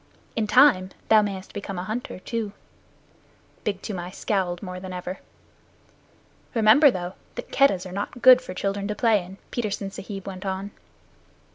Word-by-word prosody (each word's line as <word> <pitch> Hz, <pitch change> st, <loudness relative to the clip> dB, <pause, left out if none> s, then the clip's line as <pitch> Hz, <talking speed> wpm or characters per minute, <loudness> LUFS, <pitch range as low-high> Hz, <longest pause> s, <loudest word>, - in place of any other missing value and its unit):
In 220 Hz, -2 st, 0 dB
time 245 Hz, -7 st, +5 dB, 0.2 s
thou 220 Hz, -1 st, +7 dB
mayest 195 Hz, -2 st, -5 dB
become 200 Hz, -2 st, -5 dB
a 180 Hz, -, -3 dB
hunter 220 Hz, +6 st, -4 dB
too." 215 Hz, +2 st, -4 dB, 1.1 s
Big 200 Hz, -2 st, -2 dB
Toomai 180 Hz, -4 st, -4 dB
scowled 185 Hz, -2 st, -2 dB
more 180 Hz, -1 st, -6 dB
than 185 Hz, 0 st, -7 dB
ever. 180 Hz, +1 st, -5 dB, 1.4 s
"Remember, 225 Hz, +7 st, +7 dB
though, 180 Hz, -5 st, -3 dB, 0.2 s
that -, -, -7 dB
Keddahs 195 Hz, -11 st, +3 dB
are 185 Hz, -, -7 dB
not 205 Hz, +5 st, -5 dB
good 255 Hz, -1 st, +9 dB
for 185 Hz, -8 st, -8 dB
children 200 Hz, +1 st, -2 dB
to 210 Hz, -, -2 dB
play 215 Hz, -3 st, +3 dB
in," 185 Hz, +2 st, -11 dB
Petersen 205 Hz, -4 st, -3 dB
Sahib 195 Hz, -1 st, -7 dB
went 190 Hz, -1 st, -7 dB
on. 195 Hz, +1 st, -3 dB
200 Hz, 155 wpm, -25 LUFS, 185-215 Hz, 1.4 s, good